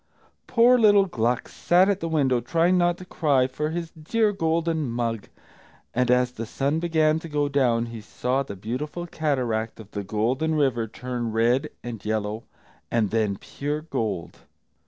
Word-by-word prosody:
Poor 245 Hz, +1 st, +5 dB
little 205 Hz, -3 st, +6 dB
Gluck 120 Hz, -8 st, -1 dB
sat 180 Hz, +2 st, +3 dB
at 200 Hz, -1 st, +1 dB
the 165 Hz, -, -3 dB
window, 135 Hz, -6 st, +2 dB
trying 170 Hz, +8 st, +2 dB
not 175 Hz, -1 st, +2 dB
to 185 Hz, -, -10 dB
cry 145 Hz, -7 st, +2 dB
for 150 Hz, +4 st, -3 dB
his 165 Hz, 0 st, -4 dB
dear 210 Hz, +8 st, 0 dB
golden 165 Hz, -5 st, 0 dB
mug, 115 Hz, -2 st, -2 dB, 0.7 s
and 125 Hz, 0 st, +1 dB
as 125 Hz, 0 st, +3 dB
the 115 Hz, -2 st, -6 dB
sun 140 Hz, +6 st, 0 dB
began 160 Hz, -2 st, +2 dB
to 165 Hz, -, -9 dB
go 145 Hz, -1 st, 0 dB
down, 125 Hz, -5 st, +2 dB
he 115 Hz, -1 st, -8 dB
saw 125 Hz, +5 st, -1 dB
the 130 Hz, -7 st, -6 dB
beautiful 130 Hz, -, -4 dB
cataract 125 Hz, -10 st, -1 dB
of 110 Hz, -2 st, -12 dB
the 100 Hz, -, -4 dB
Golden 125 Hz, +11 st, 0 dB
River 130 Hz, -6 st, +1 dB
turn 120 Hz, 0 st, -4 dB
red, 115 Hz, +4 st, +2 dB
and 120 Hz, -3 st, -6 dB
yellow, 110 Hz, 0 st, -2 dB, 0.5 s
and 110 Hz, -4 st, +1 dB
then 110 Hz, -3 st, +1 dB
pure 145 Hz, +7 st, -4 dB
gold. 105 Hz, -, -4 dB
135 Hz, 165 wpm, -25 LUFS, 115-160 Hz, 0.7 s, little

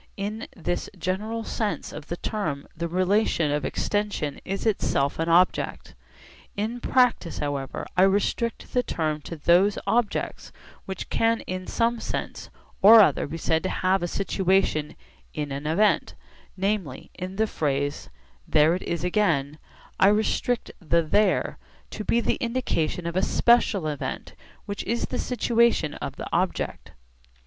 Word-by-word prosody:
In 210 Hz, +3 st, -4 dB
this 175 Hz, -1 st, -3 dB
general 210 Hz, +6 st, -2 dB
sense 215 Hz, -1 st, -3 dB
of 150 Hz, 0 st, -8 dB
the 175 Hz, -, -4 dB
term 155 Hz, -11 st, -3 dB
the 170 Hz, +1 st, -3 dB
relation 185 Hz, -3 st, +1 dB
of 145 Hz, -1 st, -1 dB
extension 200 Hz, 0 st, -2 dB
is 195 Hz, +3 st, -4 dB
itself 140 Hz, -10 st, 0 dB
an 165 Hz, +1 st, 0 dB
object. 175 Hz, -, +2 dB, 0.6 s
In 220 Hz, +4 st, -2 dB
practice 245 Hz, -8 st, +2 dB
however 140 Hz, -2 st, -3 dB
I 180 Hz, -, +4 dB
restrict 205 Hz, +4 st, +1 dB
the 250 Hz, -, +3 dB
term 155 Hz, -9 st, -2 dB
to 165 Hz, -, -7 dB
those 175 Hz, +6 st, +3 dB
objects 235 Hz, -2 st, -1 dB, 0.3 s
which 190 Hz, -2 st, -6 dB
can 225 Hz, 0 st, +2 dB
in 185 Hz, 0 st, -5 dB
some 235 Hz, 0 st, 0 dB
sense -, -, -5 dB, 0.3 s
or 220 Hz, +3 st, +10 dB
other 150 Hz, -8 st, +3 dB
be 160 Hz, +3 st, -5 dB
said 160 Hz, 0 st, +1 dB
to 185 Hz, -, -2 dB
have 190 Hz, 0 st, +1 dB
a 175 Hz, -, -1 dB
situation 190 Hz, -5 st, 0 dB, 0.4 s
in 145 Hz, -1 st, -3 dB
an 140 Hz, +2 st, -4 dB
event; 205 Hz, +7 st, +2 dB, 0.4 s
namely, 190 Hz, -8 st, -2 dB
in 185 Hz, +1 st, -6 dB
the 220 Hz, +2 st, +2 dB
phrase 145 Hz, -6 st, -2 dB, 0.4 s
'There 155 Hz, +2 st, +4 dB
it 185 Hz, -, -2 dB
is 170 Hz, -, -3 dB
again' 160 Hz, -7 st, +1 dB, 0.4 s
I -, -, +6 dB
restrict 220 Hz, +3 st, +1 dB
the 170 Hz, -2 st, +2 dB
'there' 200 Hz, +5 st, +1 dB, 0.3 s
to 215 Hz, -, -5 dB
be 235 Hz, +2 st, +2 dB
the -, -, 0 dB
indication 230 Hz, -9 st, -1 dB
of 170 Hz, 0 st, -3 dB
a 185 Hz, -, +2 dB
special 225 Hz, -5 st, +3 dB
event 150 Hz, -2 st, -4 dB, 0.3 s
which 200 Hz, -1 st, -4 dB
is 235 Hz, +3 st, -1 dB
the -, -, -4 dB
situation 235 Hz, -, +2 dB
of -, -, -6 dB
the -, -, -6 dB
object. -, -, -2 dB
185 Hz, 150 wpm, -25 LUFS, 155-215 Hz, 0.6 s, or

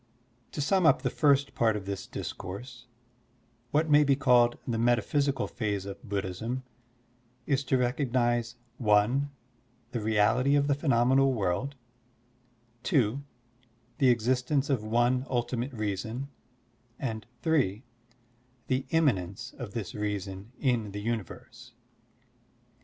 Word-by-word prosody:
8$ -, -, -37 dB
To -, -, -2 dB
sum 185 Hz, +3 st, +3 dB
Up 135 Hz, -, +4 dB
the -, -, 0 dB
first 140 Hz, -2 st, +3 dB
part 110 Hz, -2 st, +2 dB
of 100 Hz, -2 st, -5 dB
this 100 Hz, -1 st, -5 dB
discourse, 120 Hz, +6 st, -7 dB, 0.8 s
what 155 Hz, +5 st, +2 dB
may 150 Hz, -1 st, +6 dB
be 140 Hz, -1 st, +3 dB
called 125 Hz, -3 st, +4 dB
the 115 Hz, -2 st, -1 dB
metaphysical 130 Hz, +4 st, +1 dB
phase 105 Hz, -4 st, -3 dB
of 100 Hz, +3 st, -9 dB
Bud 100 Hz, -1 st, -1 dB
dhism 115 Hz, +8 st, -4 dB, 0.8 s
is 140 Hz, -1 st, +1 dB
to 130 Hz, -, +2 dB
recognize 120 Hz, -2 st, 0 dB, 0.3 s
(i) 105 Hz, +5 st, +4 dB, 0.7 s
the 120 Hz, -, -2 dB
reality 110 Hz, +6 st, +3 dB
of 145 Hz, 0 st, +3 dB
the 145 Hz, -, +2 dB
phenomenal 135 Hz, -1 st, +3 dB
world, 105 Hz, +7 st, -1 dB, 1.1 s
(2) 130 Hz, -, +1 dB, 0.8 s
the 135 Hz, -, +5 dB
existence 130 Hz, +4 st, +1 dB
of 125 Hz, -6 st, 0 dB
one 120 Hz, +3 st, +2 dB
xxltimate 125 Hz, 0 st, -2 dB
reason, 110 Hz, +6 st, -3 dB, 0.7 s
and 110 Hz, -5 st, -4 dB, 0.2 s
(3) 130 Hz, -, +1 dB, 0.8 s
the 130 Hz, +1 st, -1 dB
immanence 120 Hz, -, 0 dB
of 120 Hz, -5 st, -6 dB
this 105 Hz, -6 st, -4 dB
reason 100 Hz, 0 st, -4 dB
in 115 Hz, -7 st, 0 dB
the 105 Hz, -, -4 dB
universe. 120 Hz, +2 st, -5 dB
120 Hz, 125 wpm, -29 LUFS, 105-135 Hz, 1.1 s, may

